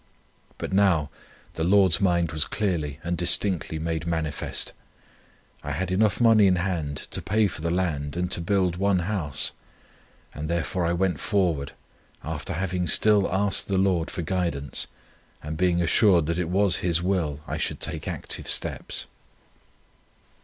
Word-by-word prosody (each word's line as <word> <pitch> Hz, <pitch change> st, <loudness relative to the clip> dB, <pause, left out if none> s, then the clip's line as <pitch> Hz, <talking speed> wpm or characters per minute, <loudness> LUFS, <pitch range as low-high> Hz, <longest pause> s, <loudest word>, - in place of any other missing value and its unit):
But -, -, -5 dB
now 90 Hz, -7 st, +3 dB, 0.4 s
the 80 Hz, -, -3 dB
Lord's 95 Hz, 0 st, +4 dB
mind 85 Hz, -4 st, +2 dB
was 80 Hz, -1 st, 0 dB
clearly 75 Hz, -5 st, -2 dB
and 85 Hz, +1 st, -1 dB
distinctly 90 Hz, -1 st, +2 dB
made 80 Hz, 0 st, -3 dB
manifest. 80 Hz, -3 st, -2 dB, 0.9 s
I 75 Hz, -, -4 dB
had 90 Hz, +5 st, -2 dB
enough 100 Hz, +1 st, +2 dB
money 110 Hz, -4 st, +6 dB
in 95 Hz, -, +4 dB
hand 90 Hz, -6 st, -2 dB, 0.2 s
to -, -, 0 dB
pay 105 Hz, +2 st, +2 dB
for 85 Hz, -5 st, -4 dB
the 85 Hz, -, -1 dB
land 85 Hz, -4 st, -1 dB
and 90 Hz, 0 st, -1 dB
to 90 Hz, -, +1 dB
build 90 Hz, -1 st, +1 dB
one 100 Hz, 0 st, +2 dB
house, 90 Hz, -8 st, -1 dB, 0.8 s
and 75 Hz, +1 st, -5 dB
therefore 85 Hz, +1 st, -1 dB
I 85 Hz, -, +1 dB
went 90 Hz, -4 st, 0 dB
forward, 85 Hz, -9 st, 0 dB, 0.5 s
after 80 Hz, +2 st, -4 dB
having 90 Hz, +1 st, -2 dB
still 105 Hz, +4 st, +3 dB
asked 100 Hz, +1 st, 0 dB
the 100 Hz, -, 0 dB
Lord 95 Hz, -4 st, +1 dB
for 85 Hz, -, -4 dB
guidance, 80 Hz, -5 st, -2 dB, 0.6 s
and 75 Hz, +1 st, -4 dB
being 85 Hz, +1 st, +2 dB
assured 85 Hz, -1 st, +4 dB
that 85 Hz, +2 st, -1 dB
it 85 Hz, -2 st, -1 dB
was 95 Hz, 0 st, +3 dB
His 85 Hz, -1 st, 0 dB
will 85 Hz, -6 st, -1 dB
I -, -, -4 dB
should -, -, -2 dB
take -, -, -3 dB
active -, -, -4 dB
steps. -, -, -2 dB
90 Hz, 155 wpm, -25 LUFS, 80-95 Hz, 0.9 s, money